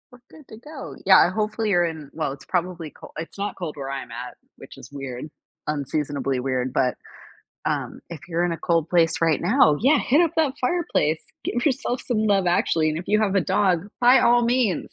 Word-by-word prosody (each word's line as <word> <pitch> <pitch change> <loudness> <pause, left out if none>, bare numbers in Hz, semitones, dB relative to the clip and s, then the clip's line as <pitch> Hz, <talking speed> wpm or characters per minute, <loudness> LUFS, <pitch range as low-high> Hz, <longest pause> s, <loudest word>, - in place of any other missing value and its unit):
We're 250 - -16
good 305 -4 -16
to 220 - -11
go. 280 +4 -9
Yeah, 190 -2 +7
hopefully, 215 +2 -1
you're 175 -3 +3
in 160 -4 -6
well, 155 -4 -2
it's 140 - -13
probably 175 -3 -2
col - - -14
it's 165 +4 -7
not 200 +1 -3
cold 165 -5 -5
where 135 -1 -5
I'm 135 -3 -6
at, 120 +2 -7 0.2
which - - -13
is 125 - -12
weird, 135 0 -6 0.4
unseasonably 145 -2 -2
weird, 130 -1 -2
but, 125 -2 +1 0.7
um, - - -2
if 170 -3 -8
you're 170 0 0
in 175 - 0
a - - -3
cold 165 -1 0
place 165 -2 +2
right 165 -2 +2
now, 180 - +4
yeah, 275 +6 +4
hit 285 +6 +3
up 340 -2 +3
that 305 -5 +2
fireplace, 250 - 0 0.2
give 240 +1 -2
yourself 250 -2 0
some 240 -4 -1
Love 200 -3 +2
Actually, 165 -2 +2
and 155 0 -2
if 175 - -8
you 215 +1 +3
have 205 -3 +1
a 195 - +4
dog, 185 0 +1
by 250 +2 +6
all 240 0 +4
means, 235 -6 0
175 Hz, 210 wpm, -23 LUFS, 150-225 Hz, 0.7 s, Yeah